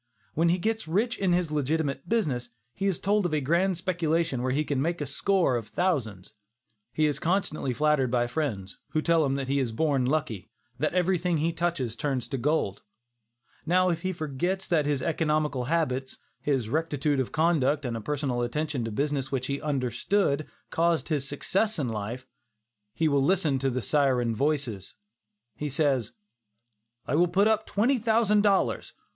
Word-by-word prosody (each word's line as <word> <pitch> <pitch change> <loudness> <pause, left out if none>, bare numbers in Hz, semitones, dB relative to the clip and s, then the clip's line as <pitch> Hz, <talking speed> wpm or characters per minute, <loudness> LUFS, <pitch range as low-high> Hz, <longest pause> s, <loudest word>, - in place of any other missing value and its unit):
When 165 +2 +2
he 175 - +3
gets 220 +1 -2
rich 220 +9 0
in 190 -2 +1
his 175 -3 +1
legitimate 145 -1 -1
business, 140 - 0 0.2
he 195 - -2
is 190 - 0
told 205 -1 +2
of 155 - -1
a - - +2
grand 170 +6 +1
speculation 165 -6 0
where 130 +1 0
he 145 +4 +1
can 140 -3 -1
make 170 +4 -1
a 145 - -2
score 175 +1 +1
of 115 -3 -3
thousands. 115 - -2 0.6
He 155 - +1
is 145 -2 0
constantly 175 -6 0
flattered 150 -1 +2
by 120 0 +2
his 120 - -4
friends, 110 -11 -3
who 155 - +1
tell 165 -1 +3
him 135 -1 0
that 135 -1 -3
he 140 +1 +1
is 125 -4 -1
born 135 0 +1
lucky, 140 -9 -2 0.3
that - - 0
everything 180 -1 +1
he 165 +2 0
touches 165 -10 -1
turns 130 -2 -2
into 130 +3 -4
gold. 140 -8 0 0.8
Now 185 +2 +3
if 170 -1 -1
he 185 +1 -1
forgets 175 +4 -2
that 155 -4 +1
his 140 -3 0
economical 150 -5 0
habits, 135 -4 -1 0.2
his 135 -6 0
rectitude 145 0 0
of 130 - -1
conduct 155 -3 +2
and 120 -2 -2
a 115 - -4
personal 140 -1 -2
attention 145 +2 -2
to - - -3
a - - -7
business 140 +2 -1
which 130 -2 -1
he 140 +1 -3
understood, 140 - 0 0.2
caused 170 -1 +1
his 145 -4 -1
success 195 +9 0
in 140 -6 -1
life, 115 +4 -4 0.7
he 160 - +2
will 140 -2 +3
listen 155 -3 +2
to 135 +1 +1
the 125 -1 -2
syren 125 -3 +2
voices. 135 -8 -1 0.6
He 150 +4 -4
says: 135 -5 +1 0.9
"I - - -3
will 170 +4 +4
put 195 +4 +3
in 220 - +5
twenty 245 +6 +2
thousand 220 -2 +3
dollars. 200 -2 +1
150 Hz, 180 wpm, -27 LUFS, 130-170 Hz, 0.9 s, in